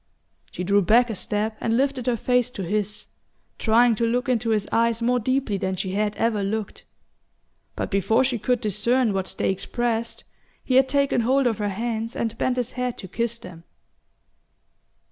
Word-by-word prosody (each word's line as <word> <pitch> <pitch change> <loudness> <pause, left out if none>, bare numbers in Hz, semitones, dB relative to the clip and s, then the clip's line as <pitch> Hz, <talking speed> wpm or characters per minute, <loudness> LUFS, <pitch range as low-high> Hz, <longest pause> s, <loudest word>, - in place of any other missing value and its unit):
She 180 - -5
drew 200 +2 +3
back 235 +6 +4
a - - -4
step 210 +3 -2
and 230 0 +1
lifted 265 -2 0
her 240 -2 +2
face 250 +1 +1
to 205 -6 -6
his, 210 +3 -2 0.5
trying 235 +2 +4
to 225 - -2
look 245 +3 0
into 235 -2 0
his 215 -2 +1
eyes 230 0 +2
more 245 +1 +1
deeply 255 -4 0
than 190 0 -1
she 185 +1 -3
had 210 +1 -1
ever 225 -2 0
looked; 205 +1 -4 0.9
but - - -4
before 220 +5 +2
she 250 -3 -1
could 245 +3 0
discern 220 +2 +1
what 190 -1 -3
they - - +1
expressed 230 +4 -2 0.4
he 255 - -2
had 260 +1 +5
taken 280 -2 +2
hold 265 +4 +2
of 225 -4 +1
her 205 -1 0
hands 225 +3 -3
and 225 -1 -2
bent 255 -1 0
his 245 -1 -2
head 250 -1 -3
to 190 - -8
kiss 235 +4 -2
them. 180 -6 -12
230 Hz, 185 wpm, -24 LUFS, 210-245 Hz, 0.9 s, had